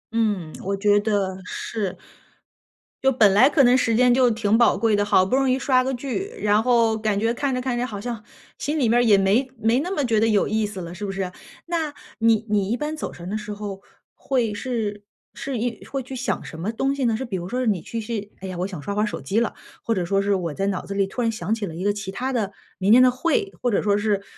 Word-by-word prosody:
嗯， 205 Hz, -8 st, 0 dB
我 195 Hz, +1 st, -1 dB
觉 205 Hz, 0 st, +4 dB
得 195 Hz, -3 st, -1 dB
是。 200 Hz, 0 st, -4 dB, 1.1 s
就 270 Hz, -, +5 dB
本 215 Hz, -6 st, +5 dB
来 250 Hz, +8 st, +6 dB
可 280 Hz, -3 st, +4 dB
能 250 Hz, +1 st, +6 dB
时 230 Hz, -3 st, +1 dB
间 250 Hz, 0 st, +5 dB
就 250 Hz, -2 st, +4 dB
挺 220 Hz, 0 st, +2 dB
宝 240 Hz, -, +4 dB
贵 225 Hz, -2 st, +2 dB
的， 205 Hz, -, +2 dB
好 185 Hz, -2 st, +4 dB
不 255 Hz, -, 0 dB
容 270 Hz, -1 st, +2 dB
易 260 Hz, -, +1 dB
刷 255 Hz, -3 st, +3 dB
个 265 Hz, +1 st, -1 dB
剧， 280 Hz, -, -4 dB
然 210 Hz, +1 st, +3 dB
后 230 Hz, -3 st, +3 dB
感 215 Hz, -2 st, 0 dB
觉 225 Hz, +2 st, +1 dB
看 270 Hz, +1 st, -1 dB
着 250 Hz, -, -1 dB
看 250 Hz, -1 st, -2 dB
着 245 Hz, -, 0 dB
好 205 Hz, -5 st, -6 dB
像 230 Hz, -1 st, -5 dB, 0.3 s
心 300 Hz, +1 st, -2 dB
里 245 Hz, -, +3 dB
面 235 Hz, +2 st, +3 dB
儿 -, -, +4 dB
也 210 Hz, -4 st, +6 dB
没 200 Hz, +7 st, +3 dB
没 230 Hz, +4 st, +2 dB
那 360 Hz, +4 st, -4 dB
么 290 Hz, -8 st, 0 dB
觉 220 Hz, -2 st, +2 dB
得 225 Hz, -, +4 dB
有 210 Hz, -2 st, +3 dB
意 215 Hz, 0 st, 0 dB
思 205 Hz, -2 st, -6 dB
了， 170 Hz, +1 st, -7 dB
是 205 Hz, +2 st, -5 dB
不 195 Hz, -, -3 dB
是？ 195 Hz, -1 st, -3 dB, 0.4 s
那 325 Hz, -4 st, -2 dB, 0.3 s
你 225 Hz, -1 st, +3 dB
你 200 Hz, -2 st, +1 dB
一 240 Hz, -, +1 dB
般 300 Hz, +1 st, -3 dB
走 -, -, -5 dB
神 175 Hz, +1 st, -9 dB
的 215 Hz, -, -2 dB
时 210 Hz, -1 st, -6 dB
候 200 Hz, -2 st, -6 dB, 0.3 s
会 240 Hz, -6 st, -1 dB
是 210 Hz, -3 st, -3 dB, 0.3 s
是 275 Hz, -3 st, -4 dB
一 235 Hz, 0 st, -3 dB
会 275 Hz, -1 st, -3 dB
是 265 Hz, -, -7 dB
想 260 Hz, +1 st, -2 dB
什 160 Hz, -, -9 dB
么 190 Hz, +7 st, -2 dB
东 270 Hz, +4 st, 0 dB
西 275 Hz, -, -2 dB
呢？ 225 Hz, -2 st, +2 dB
是 265 Hz, -, -4 dB
比 205 Hz, -5 st, -4 dB
如 180 Hz, +1 st, -4 dB
说 250 Hz, -, -2 dB
是 250 Hz, -, 0 dB
你 195 Hz, -5 st, +1 dB
其 230 Hz, -, -5 dB
实 215 Hz, -, -7 dB
是， 205 Hz, -, -14 dB
哎 190 Hz, -, -7 dB
呀， 185 Hz, -2 st, -6 dB
我 185 Hz, +2 st, -1 dB
想 180 Hz, -7 st, -7 dB
刷 200 Hz, +6 st, -4 dB
会 210 Hz, -, +1 dB
儿 -, -, +3 dB
手 210 Hz, -, -4 dB
机 215 Hz, +4 st, 0 dB
了。 235 Hz, -, -1 dB, 0.3 s
或 230 Hz, -, 0 dB
者 180 Hz, -4 st, -1 dB
说 195 Hz, +2 st, +1 dB
是 200 Hz, 0 st, +1 dB
我 170 Hz, -5 st, -2 dB
在 195 Hz, +4 st, -1 dB
脑 195 Hz, -2 st, -2 dB
子 200 Hz, -, -5 dB
里 195 Hz, -1 st, +2 dB
突 245 Hz, +6 st, -4 dB
然 230 Hz, -, +2 dB
想 215 Hz, -1 st, -2 dB
起 220 Hz, -2 st, -2 dB
了 165 Hz, -3 st, -7 dB
一 180 Hz, -, -5 dB
个 205 Hz, -, +3 dB
其 200 Hz, -2 st, -5 dB
他 255 Hz, +7 st, -3 dB
的 210 Hz, -5 st, -1 dB, 0.2 s
明 195 Hz, +3 st, +4 dB
天 255 Hz, +1 st, +8 dB
的 250 Hz, -, +6 dB
会， 365 Hz, -, 0 dB
或 245 Hz, -, +1 dB
者 205 Hz, -, +1 dB
说 205 Hz, -1 st, +2 dB
是， 205 Hz, -2 st, 0 dB
220 Hz, 295 characters per minute, -23 LUFS, 200-250 Hz, 1.1 s, 天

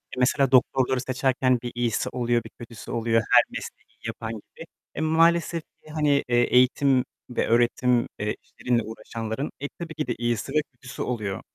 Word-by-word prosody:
E, -, -, -5 dB
mesela 135 Hz, +1 st, +3 dB
doktorları 130 Hz, 0 st, +3 dB
seçerken 130 Hz, 0 st, +1 dB
bir 120 Hz, -, -5 dB
iyisi 120 Hz, -3 st, 0 dB
oluyor, 120 Hz, -2 st, 0 dB
bir 115 Hz, -, -10 dB
kötüsü 115 Hz, -1 st, -10 dB
oluyor. 115 Hz, 0 st, +2 dB
Her -, -, +8 dB
mesleği -, -, -9 dB
yapan 110 Hz, 0 st, -5 dB
gibi. 110 Hz, -, -11 dB, 0.3 s
Eee, -, -, -3 dB
maalesef 165 Hz, +1 st, +3 dB
ki 155 Hz, -, -22 dB
hani, 150 Hz, -2 st, +2 dB
eee, 120 Hz, 0 st, +4 dB
eğitim 125 Hz, +2 st, +3 dB, 0.2 s
ve 125 Hz, -, -1 dB
öğretim, 120 Hz, +1 st, +3 dB
eee, 105 Hz, 0 st, -1 dB
işleriyle 120 Hz, -2 st, -1 dB
uğraşanların, 115 Hz, +3 st, -5 dB
eee, 145 Hz, -, -4 dB
tabii 170 Hz, -2 st, -6 dB
ki 150 Hz, -3 st, -3 dB
de, 120 Hz, -, -1 dB
iyisi 120 Hz, +2 st, -1 dB
ve 150 Hz, -, +4 dB
kötüsü 125 Hz, +1 st, -9 dB
oluyor. 105 Hz, -6 st, -3 dB
125 Hz, 170 wpm, -25 LUFS, 115-135 Hz, 0.3 s, Her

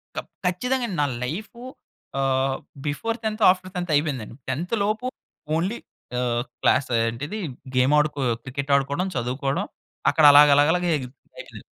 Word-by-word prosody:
ఖ -, -, -13 dB, 0.3 s
-ఖచ్చితంగా 245 Hz, +8 st, 0 dB
అండి. 185 Hz, -, -5 dB
నా -, -, +3 dB, 0.2 s
లైఫు 205 Hz, -, -5 dB, 0.6 s
ఆహ్, 135 Hz, 0 st, +1 dB, 0.3 s
బిఫోర్ 225 Hz, +11 st, -2 dB
10థ్ 220 Hz, 0 st, -2 dB
ఆఫ్టర్ 185 Hz, 0 st, +1 dB
10థ్ 175 Hz, -2 st, -3 dB
అయిపోయిందండి. 140 Hz, -7 st, -1 dB
10థ్ 175 Hz, -, -2 dB
లోపు 215 Hz, +5 st, -1 dB, 0.5 s
ఓన్లీ 185 Hz, +8 st, -1 dB, 0.4 s
ఆహ్, 120 Hz, -1 st, 0 dB, 0.2 s
క్లాస 140 Hz, -, +3 dB, 0.2 s
ఏంటిదీ, 145 Hz, -, -4 dB, 0.4 s
గేమడుకో 150 Hz, +3 st, +3 dB, 0.2 s
క్రికెట్టాడుకోడం, 140 Hz, +5 st, 0 dB
చదువుకోడం. 130 Hz, +3 st, -1 dB, 0.4 s
అక్కడలాగలగల 145 Hz, +1 st, +7 dB, 0.2 s
ఎగిల్ 125 Hz, -3 st, -7 dB, 0.3 s
ఎగిల్ -, -, -12 dB
145 Hz, 115 wpm, -24 LUFS, 135-185 Hz, 0.6 s, అక్కడలాగలగల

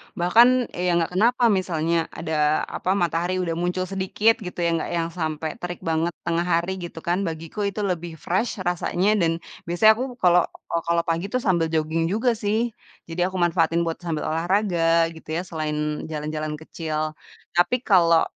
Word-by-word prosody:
bahkan 200 Hz, +8 st, +6 dB, 0.2 s
ya 180 Hz, -1 st, 0 dB
enggak 170 Hz, 0 st, +1 dB
kenapa 240 Hz, +2 st, +3 dB
misalnya 170 Hz, -3 st, 0 dB
ada, 155 Hz, -2 st, +1 dB
apa, 185 Hz, +1 st, -1 dB
matahari 175 Hz, 0 st, 0 dB
udah 165 Hz, -1 st, -2 dB
muncul 180 Hz, +1 st, -1 dB
sedikit 195 Hz, +5 st, +1 dB
gitu 180 Hz, -3 st, -7 dB
yang 170 Hz, -1 st, +1 dB
enggak -, -, -4 dB
yang 165 Hz, 0 st, -1 dB
sampai 160 Hz, -2 st, -3 dB
terik 175 Hz, -1 st, -6 dB
banget 165 Hz, +1 st, 0 dB
tengah 170 Hz, +1 st, 0 dB
hari 175 Hz, +2 st, 0 dB
gitu 170 Hz, -2 st, -8 dB
kan, 175 Hz, +2 st, 0 dB
bagiku 165 Hz, +5 st, -6 dB
itu 205 Hz, +1 st, -3 dB
lebih 175 Hz, -3 st, -2 dB
fresh 190 Hz, +8 st, -1 dB
rasanya 180 Hz, +3 st, +1 dB
dan 165 Hz, -2 st, +2 dB, 0.4 s
biasanya 175 Hz, +6 st, +6 dB
aku 255 Hz, -1 st, -3 dB
kalo 180 Hz, -7 st, +4 dB, 0.3 s
oh, 170 Hz, -, +1 dB
kalo 170 Hz, 0 st, +2 dB
pagi 170 Hz, +2 st, -1 dB
tuh 250 Hz, +4 st, -2 dB
sambil 170 Hz, -4 st, +2 dB
jogging 160 Hz, +1 st, 0 dB
juga 225 Hz, +7 st, +1 dB
sih, 225 Hz, +1 st, 0 dB, 0.3 s
jadi 175 Hz, +2 st, -1 dB
aku 190 Hz, -, -7 dB
manfaatin 170 Hz, -1 st, +2 dB
buat 165 Hz, -1 st, -3 dB
sambil 165 Hz, -3 st, -3 dB
olahraga 165 Hz, -1 st, +2 dB
gitu 160 Hz, -1 st, -14 dB
ya 170 Hz, -, 0 dB
selain 155 Hz, -4 st, -3 dB, 0.3 s
jalan-jalan 155 Hz, 0 st, -4 dB
kecil. 155 Hz, 0 st, -4 dB, 0.4 s
Tapi 180 Hz, +8 st, +2 dB
kalo 170 Hz, -6 st, +5 dB
170 Hz, 170 wpm, -24 LUFS, 165-185 Hz, 0.4 s, bahkan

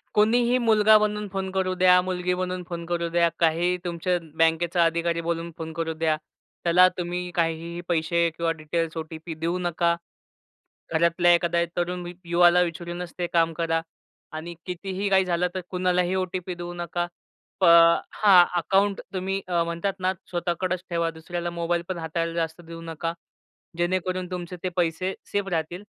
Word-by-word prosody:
कोणीही 235 Hz, +3 st, +4 dB
मुलगा 220 Hz, -3 st, +5 dB
बनून 210 Hz, 0 st, -1 dB
फोन 190 Hz, -1 st, -2 dB
करू 190 Hz, -1 st, 0 dB
द्या, 180 Hz, 0 st, +6 dB
मुलगी 180 Hz, 0 st, -1 dB
बनून 185 Hz, 0 st, -3 dB
फोन 170 Hz, -1 st, -5 dB
करू 170 Hz, 0 st, -1 dB
द्या, 170 Hz, 0 st, +3 dB
काहीही 170 Hz, +2 st, +2 dB
तुमच्या 175 Hz, +1 st, 0 dB, 0.2 s
बँकेचा 165 Hz, +2 st, +3 dB
अधिकारी 170 Hz, 0 st, 0 dB
बोलून 170 Hz, 0 st, -3 dB
फोन 160 Hz, 0 st, -6 dB
करू 165 Hz, 0 st, -2 dB
द्या, 160 Hz, -1 st, +1 dB, 0.5 s
त्याला 180 Hz, +2 st, +6 dB
तुम्ही 180 Hz, 0 st, -3 dB
काहीही 170 Hz, +1 st, -1 dB
पैसे 170 Hz, 0 st, +1 dB
किंवा 170 Hz, -1 st, +1 dB
डिटेल्स, 165 Hz, +1 st, -2 dB
ओ-टी-पी 160 Hz, +1 st, -6 dB
देऊ 170 Hz, +2 st, 0 dB
नका. 170 Hz, -1 st, +1 dB, 1.0 s
घरातल्या 170 Hz, +2 st, +4 dB
एखाद्या 170 Hz, 0 st, +2 dB
तरुण 175 Hz, +1 st, -1 dB
मि 175 Hz, 0 st, -7 dB
युवाला 175 Hz, +1 st, +5 dB
विचारूनच 175 Hz, 0 st, -4 dB
ते 175 Hz, -1 st, -1 dB
काम 165 Hz, -1 st, +3 dB
करा. 165 Hz, 0 st, 0 dB, 0.5 s
आणि 160 Hz, +2 st, -6 dB
कितीही 190 Hz, +2 st, -3 dB
काही 190 Hz, -1 st, +4 dB
झालं 180 Hz, 0 st, +1 dB
तर 185 Hz, -, -2 dB
कुणालाही 180 Hz, 0 st, +1 dB
ओ-टी-पी 185 Hz, -1 st, -3 dB
देऊ 175 Hz, 0 st, -6 dB
नका. 175 Hz, 0 st, -3 dB, 0.6 s
प -, -, +5 dB, 0.5 s
हां, 190 Hz, -4 st, +6 dB
अकाउंट 195 Hz, +3 st, +1 dB
तुम्ही 190 Hz, +1 st, -2 dB
अ, 170 Hz, -2 st, +1 dB
म्हणतात 170 Hz, +4 st, -2 dB
ना 185 Hz, 0 st, +1 dB, 0.2 s
स्वतःकडेच 175 Hz, +1 st, -2 dB
ठेवा, 170 Hz, -1 st, 0 dB
दुसऱ्याला 175 Hz, +2 st, -5 dB
मोबाईल 170 Hz, 0 st, -1 dB
पण 185 Hz, -, -2 dB
हाताळायला 165 Hz, +1 st, -2 dB
जास्त 165 Hz, 0 st, -2 dB
देऊ 165 Hz, 0 st, -10 dB
नका. 165 Hz, 0 st, -4 dB, 0.6 s
जेणेकरून 185 Hz, +1 st, -1 dB
तुमचे 180 Hz, 0 st, -5 dB
ते 185 Hz, -, 0 dB
पैसे 175 Hz, +2 st, 0 dB, 0.2 s
सेफ 205 Hz, -1 st, -1 dB
राहतील 170 Hz, +3 st, -2 dB
175 Hz, 155 wpm, -25 LUFS, 170-185 Hz, 1.0 s, द्या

